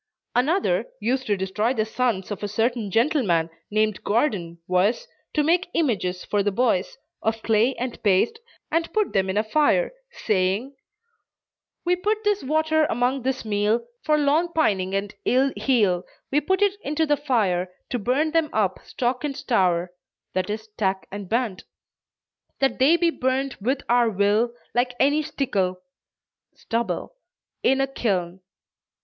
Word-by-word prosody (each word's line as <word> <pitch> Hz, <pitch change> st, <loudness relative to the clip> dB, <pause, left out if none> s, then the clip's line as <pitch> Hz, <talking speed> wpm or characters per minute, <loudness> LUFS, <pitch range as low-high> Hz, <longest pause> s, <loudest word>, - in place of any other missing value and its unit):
Another, 360 Hz, -, +1 dB
used 260 Hz, +2 st, -1 dB
to 205 Hz, -2 st, +1 dB
destroy 210 Hz, +6 st, 0 dB
the 215 Hz, -2 st, +1 dB
sons 220 Hz, -4 st, -1 dB
of 205 Hz, -, -4 dB
a 205 Hz, -, -2 dB
certain 225 Hz, +1 st, 0 dB
gentleman 200 Hz, -, +2 dB, 0.2 s
named 215 Hz, -1 st, 0 dB
Gordon 205 Hz, -, 0 dB
was, 200 Hz, -, +1 dB, 0.3 s
to 300 Hz, -, +3 dB
make 350 Hz, +4 st, +2 dB
images 195 Hz, -, 0 dB
for 205 Hz, -, +1 dB
the 205 Hz, +1 st, +1 dB
boys, 205 Hz, -3 st, 0 dB, 0.2 s
of 220 Hz, 0 st, -1 dB
clay 225 Hz, +4 st, +3 dB
and 250 Hz, 0 st, -5 dB
paste, 205 Hz, -, +2 dB, 0.3 s
and 330 Hz, +1 st, 0 dB
put 425 Hz, -4 st, +1 dB
them 190 Hz, -1 st, +1 dB
in 190 Hz, -, -1 dB
a 215 Hz, -, +3 dB
fire, 305 Hz, -, +2 dB, 0.2 s
saying: 205 Hz, +6 st, -1 dB, 1.1 s
"We 355 Hz, +1 st, +3 dB
put 420 Hz, +4 st, -1 dB
this 415 Hz, -1 st, +1 dB
water 315 Hz, +2 st, +2 dB
among 250 Hz, +1 st, 0 dB
this 260 Hz, -1 st, -2 dB
meal 215 Hz, +2 st, +1 dB, 0.2 s
For 305 Hz, -1 st, +3 dB
long 300 Hz, +4 st, +2 dB
pining 195 Hz, -11 st, +1 dB
and 200 Hz, +1 st, -2 dB
ill 265 Hz, +2 st, +2 dB
heal, 205 Hz, -9 st, +2 dB, 0.3 s
We 295 Hz, +2 st, +3 dB
put 380 Hz, +7 st, +1 dB
it 405 Hz, 0 st, +2 dB
into 305 Hz, +3 st, 0 dB
the 295 Hz, -1 st, +3 dB
fire 205 Hz, -11 st, 0 dB, 0.2 s
To 245 Hz, -, 0 dB
burn 265 Hz, +8 st, +1 dB
them 325 Hz, -1 st, +2 dB
up 195 Hz, -4 st, 0 dB
stock 250 Hz, +1 st, -2 dB
and 285 Hz, -2 st, -3 dB
stour 180 Hz, -6 st, +1 dB, 0.4 s
(i. 185 Hz, -, +2 dB
e. 210 Hz, -, -1 dB
stack 210 Hz, -3 st, -3 dB
and 200 Hz, -2 st, -7 dB
band.) 225 Hz, -5 st, -1 dB, 0.9 s
That 270 Hz, 0 st, +1 dB
they 295 Hz, +6 st, +5 dB
be 340 Hz, -1 st, +2 dB
burned 260 Hz, -1 st, -1 dB
with 260 Hz, +6 st, 0 dB
our 240 Hz, -1 st, +4 dB
will, 205 Hz, +3 st, +2 dB, 0.2 s
Like 245 Hz, +1 st, +1 dB
any 290 Hz, +3 st, +3 dB
stikkle 205 Hz, -11 st, -1 dB, 0.8 s
(stubble) 235 Hz, -, -3 dB, 0.5 s
in 270 Hz, -, +3 dB
a 270 Hz, -, +3 dB
kiln." 190 Hz, -9 st, -2 dB
240 Hz, 155 wpm, -24 LUFS, 200-290 Hz, 1.1 s, they